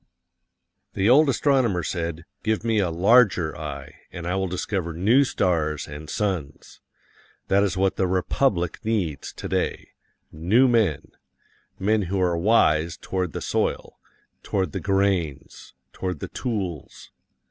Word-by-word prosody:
The 95 - +1
old 140 +5 +6
astronomer 130 -9 +2
said, 85 -2 -4 0.2
"Give 110 0 -1
me 115 -2 +1
a 95 -4 +1
larger 90 - +3
eye, 75 -1 -8
and 85 - -7
I 90 - -1
will 95 0 0
discover 90 -1 -3
new 110 - +4
stars 80 - 0
and 75 +1 -9
suns." 95 -9 -4 0.7
That 100 +1 +4
is 95 -2 0
what 95 0 +1
the 95 - +1
republic 90 +1 0
needs 100 -10 -2
today - - -3 0.4
new 100 +12 +3
men 105 - +1 0.7
men 105 +2 +1
who 100 0 -1
are 90 -2 +2
wise 85 -4 +2
toward 90 -3 -3
the - - -4
soil, - - -2 0.4
toward 95 -2 -1
the 95 - -4
grains, 95 -8 -1 0.2
toward 90 -5 -4
the - - -6
tools. 95 - -5
95 Hz, 135 wpm, -24 LUFS, 85-105 Hz, 0.7 s, old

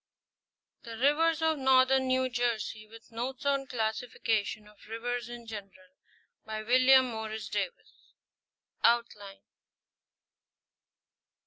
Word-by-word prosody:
THE 230 -3 -9
RIVERS 315 +5 +2
OF 320 -2 +1
NORTHERN 265 0 +4
NEW 260 0 +2
JERSEY, 235 -3 -2
WITH 225 +2 -16
NOTES 250 +4 -5
ON 280 -1 +2
THE 270 - -14
CLASSIFICATION 220 -2 -2
OF 210 -1 -19
RIVERS 240 +1 -4
IN 240 -1 -9
GENERAL. 225 +6 -10 0.5
By 215 0 -5
WILLIAM 255 +3 +5
Morris 220 -2 -5
DAVIS. 200 -3 -6 0.7
OUTLINE. 215 -4 0
240 Hz, 105 wpm, -30 LUFS, 220-260 Hz, 0.7 s, WILLIAM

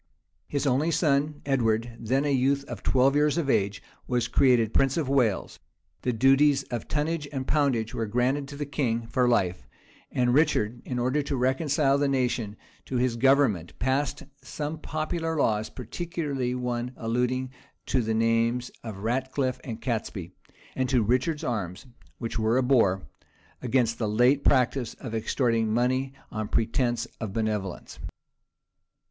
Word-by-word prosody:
His 145 0 -2
only 140 +4 +2
son, 150 -2 +1
Edward, 115 -4 0
then 130 +5 0
a 145 - +1
youth 135 +2 +2
of 120 -7 -8
twelve 135 +2 +3
years 150 +1 +3
of 145 -5 +1
age, 100 0 0 0.2
was 125 -2 0
created 120 -4 +3
prince 135 +1 +2
of 155 -5 0
Wales: 125 -7 +1 0.4
the 125 - 0
duties 135 +3 +4
of 120 -3 -4
tonnage 150 0 -1
and 135 -2 -3
poundage 135 -7 +1
were 115 - -2
granted 125 +5 0
to 145 - -9
the 145 0 -3
king 120 -5 -1
for 125 +2 +1
life; 90 -6 0 0.4
and 125 -1 +2
Richard, 125 -6 +2
in 125 - -3
order 130 +4 +1
to 140 -1 -3
reconcile 135 +2 +2
the 145 - +2
nation 125 -6 -1 0.3
to 130 - -5
his 125 -1 +1
government, 125 - +2
passed 135 +3 -1 0.2
some 150 +4 -5
popular 160 +1 -3
laws, 110 -6 +1
particularly 140 -2 -3
one 125 0 -3
alluding 125 +3 -1 0.3
to 130 - +1
the 110 -1 -1
names 115 +2 +1
of 105 -4 -7
Ratcliffe 130 +2 -1
and 115 -4 -6
Catesby; 110 -8 -3 0.4
and 130 -1 0
to 125 -4 +3
Richard's 130 +8 0
arms, 100 -2 -3 0.3
which 115 -1 -4
were 110 +2 +2
a 130 - +3
boar, 115 -8 +3 0.6
against 120 -2 +1
the 110 -3 0
late 125 +6 +3
practice 125 -2 +2
of 120 -4 -8
extorting 115 0 +1
money 130 +3 +1 0.2
on 110 -1 -3
pretence 120 +2 0
of 110 -4 -4
benevolence. 105 -4 -3
125 Hz, 155 wpm, -27 LUFS, 115-140 Hz, 0.6 s, duties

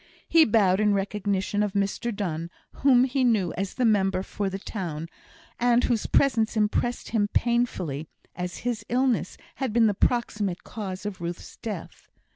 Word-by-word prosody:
He 325 -1 +6
bowed 200 -4 +3
in 210 -1 +3
recognition 200 0 -1
of 205 -2 0
Mr 200 +4 -1
Donne, 170 -6 -3 0.3
whom 255 -3 +5
he 260 0 +1
knew 215 -8 +2
as 195 +1 -4
the 250 - +1
member 195 -4 +2
for 200 0 -3
the 190 - -4
town, 170 -6 -5 0.5
and 240 0 +3
whose 235 -3 +1
presence 225 -5 +2
impressed 215 +3 0
him 210 -3 +1
painfully, 205 - 0 0.3
as 180 -1 -4
his 235 -4 -1
illness 255 0 +1 0.2
had 265 -4 -1
been 230 +1 +4
the 210 - +3
proximate 205 -4 0
cause 195 -3 -6
of 195 -4 -5
Ruth's 170 +1 -6
death. 210 -7 -7
210 Hz, 160 wpm, -26 LUFS, 190-235 Hz, 0.5 s, He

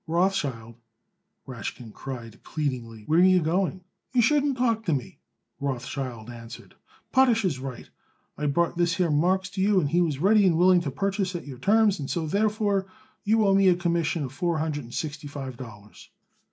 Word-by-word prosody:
"Rothschild," 145 -10 -1 0.7
Rashkin 120 -2 -7
cried 120 -4 -8
pleadingly, 120 -7 -4
"where 160 +2 +3
are - - +6
you 185 0 +6
going?" 180 +3 -1 0.3
"You 245 -2 +4
shouldn't 285 +1 +2
talk 230 -3 +1
to 170 - +1
me," 130 - -6 0.4
Rothschild 130 -4 -4
answered. 115 -1 -10 0.4
"Potash 245 -5 +4
is 150 -8 -1
right. 130 -2 -7 0.5
I 150 - -2
brought 170 +4 +1
this 175 -1 +2
here 175 -3 +1
Marks 180 +5 +1
to 195 -1 -3
you 200 0 +4
and 145 -5 -1
he 175 - +3
was 155 -5 0
ready 200 +5 +4
and 165 -3 +3
willing 180 0 +5
to 155 - -3
purchase 195 +5 -2
at 170 - -5
your 135 -4 -9
terms, 210 +4 +3
and 140 - -5
so, 165 -2 -1
therefore, 205 +2 0 0.4
you 220 +1 +3
owe 195 - +4
me 195 0 +4
a 180 - +6
commission 170 -2 0
of 130 -1 -6
four 170 +3 -1
hundred 155 -3 -2
and 120 - -12
sixty 150 -1 -4
five 135 -3 -6
dollars." 105 -4 -12
170 Hz, 185 wpm, -26 LUFS, 135-195 Hz, 0.7 s, are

